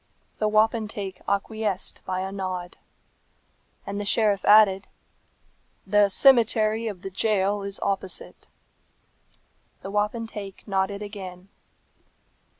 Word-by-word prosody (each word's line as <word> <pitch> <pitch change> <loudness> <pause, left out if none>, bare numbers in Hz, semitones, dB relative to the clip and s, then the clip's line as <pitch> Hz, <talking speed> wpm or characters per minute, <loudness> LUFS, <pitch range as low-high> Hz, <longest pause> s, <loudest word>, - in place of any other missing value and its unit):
The 215 - +1
wapentake 215 -3 0
acquiesced 200 -1 -2
by 185 0 -2
a 190 0 -4
nod. 185 -2 -5 1.1
And 200 +1 -4
the - - -2
sheriff 205 -1 +2
added, 205 -2 +6 1.0
"The 205 +1 +4
cemetery 225 -1 +4
of 195 -4 -6
the 195 - -6
jail 200 0 +1
is 200 0 -3
opposite." 195 -2 -3 1.4
The 195 - -6
wapentake 210 -1 -3
nodded 200 +1 -1
again. 190 -3 -9
200 Hz, 100 wpm, -25 LUFS, 190-215 Hz, 1.4 s, added